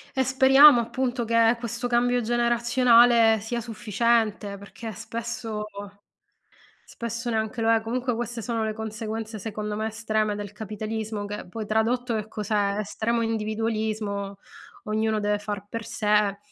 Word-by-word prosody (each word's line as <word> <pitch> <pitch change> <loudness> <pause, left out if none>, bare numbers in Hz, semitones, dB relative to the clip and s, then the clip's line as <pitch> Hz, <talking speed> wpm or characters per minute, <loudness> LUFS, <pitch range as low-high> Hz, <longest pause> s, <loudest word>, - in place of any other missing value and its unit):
E 265 - +3
speriamo 265 +1 +7
appunto, 245 +1 -2
che 230 +1 +3
questo 235 +1 -3
cambio 245 0 +2
generazionale 235 -1 +4
sia 235 +3 -3
sufficiente, 220 -2 0
perché 220 +3 -8
spesso 225 0 -5 1.4
spesso 235 +1 -3
neanche 220 +1 -2
lo 225 0 +3
è, 225 - +4
comunque 245 +3 -2
queste 235 0 -4
sono 225 -1 -2
le 215 - -2
conseguenze, 220 0 -5
secondo 210 0 -4
me 220 +1 -1
estreme 215 -1 -1
del 205 -1 -6
capitalismo, 215 0 -5
che 205 -2 -6
poi 220 +4 -6
tradotto 235 +3 0
che 215 -1 -2
cos'è? 205 -1 -1
Estremo 225 +3 -1
individualismo, 215 -2 -2 0.5
ognuno 215 0 0
deve 205 0 0
far 205 -1 -5
per 230 -1 -5
sé, 210 -2 +1
220 Hz, 135 wpm, -25 LUFS, 210-235 Hz, 1.4 s, speriamo